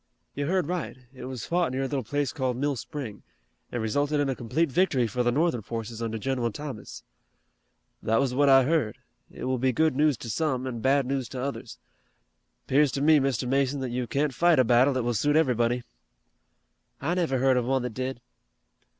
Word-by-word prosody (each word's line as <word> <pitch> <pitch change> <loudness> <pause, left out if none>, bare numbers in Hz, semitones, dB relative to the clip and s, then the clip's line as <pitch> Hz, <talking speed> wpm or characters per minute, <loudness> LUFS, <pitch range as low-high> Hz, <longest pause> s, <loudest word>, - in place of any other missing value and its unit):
"You 140 0 -3
heard 185 0 +1
right. 175 -4 -4 0.2
It 130 - -9
was 130 -4 -6
fought 175 -4 0
near 130 +1 -2
a - - -1
little 140 -1 -2
place 145 +4 -2
called 130 -4 -1
Mill 140 +1 0
Spring, 125 -4 -7 0.5
and 120 -2 -2
resulted 145 +7 0
in 145 -1 +1
a 135 - -1
complete 130 +7 -1
victory 150 -7 +2
for 115 +3 -2
the 120 0 +2
Northern 145 -2 +1
forces 115 +1 -6
under 115 -1 -2
General 125 0 -1
Thomas." 135 -3 -8 1.0
"That 115 +1 +1
was 135 -2 0
what 140 +2 +3
I 135 -1 +7
heard. 140 -6 0 0.3
It - - -10
will 130 -1 -1
be 130 +1 +2
good 155 +1 +2
news 150 -2 +3
to 115 - -8
some, 130 -1 -1
an' 125 -3 -4
bad 135 +3 +2
news 130 -2 -2
to 130 - -6
others. 140 +2 -5 0.9
'Pears 145 +1 +3
to 140 - -2
me, 155 0 +6
Mr. 130 -3 -1
Mason, 135 +1 +1
that 130 -2 -3
you 125 0 -2
can't 140 +2 0
fight 170 +3 +4
a 130 - +6
battle 125 +3 +4
that 130 - 0
will 120 0 0
suit 145 +7 +1
everybody." 125 -5 +2 1.2
"I 150 +6 -1
never 170 -7 0
heard 130 +1 +3
of 125 - 0
one 130 0 +1
that 125 -2 -4
did." 130 +1 -4
130 Hz, 205 wpm, -27 LUFS, 120-145 Hz, 1.2 s, I